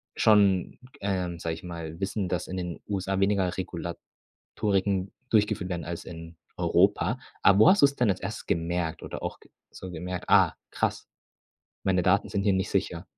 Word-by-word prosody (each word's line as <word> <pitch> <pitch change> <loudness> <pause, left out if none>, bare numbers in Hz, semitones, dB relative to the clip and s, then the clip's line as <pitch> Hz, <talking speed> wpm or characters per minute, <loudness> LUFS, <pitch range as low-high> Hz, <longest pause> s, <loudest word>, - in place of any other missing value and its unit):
schon, 100 -4 +3 0.2
ähm 90 -3 -1
sage 80 -1 -2
ich 80 - -9
mal, 85 -2 -7
Wissen, 95 0 -2
dass 90 -3 -2
in 95 - -5
den 90 -2 -4
USA 95 -1 -1
weniger 95 -2 +2
Regulatoriken 95 +2 -3 0.2
durchgeführt 105 -3 +2
werden 85 -2 -3
als 85 0 -5
in 80 0 -9 0.2
Europa. - - +2 0.2
Aber 100 +1 +6
wo 110 - +8
hast 195 -5 +5
du - - +11
es 140 0 0
denn 120 -4 +2
als 95 - 0
Erstes 100 +3 -6
gemerkt 85 -1 -1
oder - - -6
auch - - -5
g - - -21 0.2
so 95 -1 -9
gemerkt: 90 +2 -5
„Ah, - - +5 0.2
krass, - - -2 0.8
meine 90 -2 +2
Daten 100 +2 +3
sind 100 -1 -1
hier 100 - +4
nicht 95 0 0
sicher.” - - -1
95 Hz, 180 wpm, -27 LUFS, 85-100 Hz, 0.8 s, du